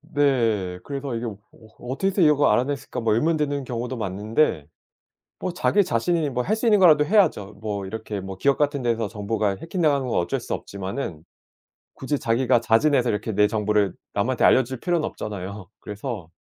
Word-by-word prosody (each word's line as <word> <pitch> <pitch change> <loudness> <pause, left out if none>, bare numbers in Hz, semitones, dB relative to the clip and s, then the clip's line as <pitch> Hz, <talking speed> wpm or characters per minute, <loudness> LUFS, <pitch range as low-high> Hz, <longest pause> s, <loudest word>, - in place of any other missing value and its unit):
네. 120 - 0
그래서 140 -2 -4
이게 115 +1 -3
'어 105 -4 -5 0.4
어떻게 130 +10 -2
해서 195 0 -1
이걸 150 -2 +5
알아냈을까?' 135 +1 -1
뭐 115 -2 +2
의문 155 +8 +2
드는 145 -2 -1
경우도 125 +1 -4
많은데 105 - 0 0.7
뭐 185 - -3
자기 200 +3 +2
자신이 155 +5 0
뭐 125 -1 -2
할 215 - 0
수 220 - -4
있는 210 -2 +5
거라도 155 -5 +6
해야죠. 165 - +2
뭐 100 -3 -3
이렇게 105 0 -5
뭐 95 0 -7
기업 140 +6 +2
같은 145 -2 0
데서 115 -2 0
정보가 105 -1 -2
해킹당하는 150 - 0
건 - - -1
어쩔 85 0 -1
수 - - -5
없지만은 95 - -5 0.7
굳이 140 +1 -2
자기가 120 +1 +2
자진해서 125 +2 +3
이렇게 105 +2 -2
내 105 +1 +4
정보를 105 -3 +1 0.2
남한테 - - 0
알려줄 130 -1 +3
필요는 175 -3 0
없잖아요. 100 -2 -6
그래서 105 - -6
120 Hz, 385 characters per minute, -24 LUFS, 105-145 Hz, 0.7 s, 거라도